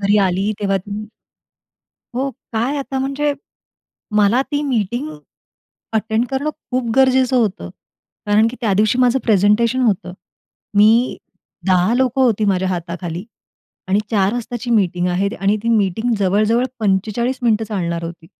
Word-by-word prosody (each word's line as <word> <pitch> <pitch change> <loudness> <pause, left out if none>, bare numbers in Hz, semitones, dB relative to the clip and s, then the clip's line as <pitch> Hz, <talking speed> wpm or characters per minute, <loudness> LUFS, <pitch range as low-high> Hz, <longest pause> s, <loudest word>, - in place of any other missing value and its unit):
घरी 200 +1 +2
आली 190 +4 0
तेव्हा 195 -1 +1
ती 205 +3 -7 1.1
हो, 270 +2 -1 0.2
काय, 240 +6 0
आता 270 -1 -3
म्हणजे 275 +2 0 0.8
मला 210 +5 +4
ती 290 - +1
मीटिंग 225 - -1 0.8
अटेंड 220 +2 0
करणं 275 +3 -1 0.2
खूप 250 -2 -1
गरजेचं 260 -1 +4
होतं, 200 - -1 0.6
कारण 210 +2 +4
की 250 - -9
त्यादिवशी 215 +1 +2
माझं 255 +1 +3
प्रेझेंटेशन 220 +4 +3
होतं. 195 -6 0 0.6
मी 225 +4 +4 0.5
10 185 +3 +3
लोकं 260 +1 +1
होती 220 -4 +2
माझ्या 190 -2 +1
हाताखाली, 175 0 -4 0.6
आणि 195 +2 +2
4 200 -3 +2
वाजताची 240 0 -4
मीटिंग 180 -5 +1
आहे, 185 +3 0
आणि 200 +2 +2
ती 230 - -2
मीटिंग 220 +2 +1
जवळ-जवळ 210 +5 +2 0.2
45 215 +6 0
मिनिटं 225 -2 +2
चालणार 170 -5 -3
होती. 165 -1 -8
215 Hz, 135 wpm, -19 LUFS, 195-245 Hz, 1.1 s, मला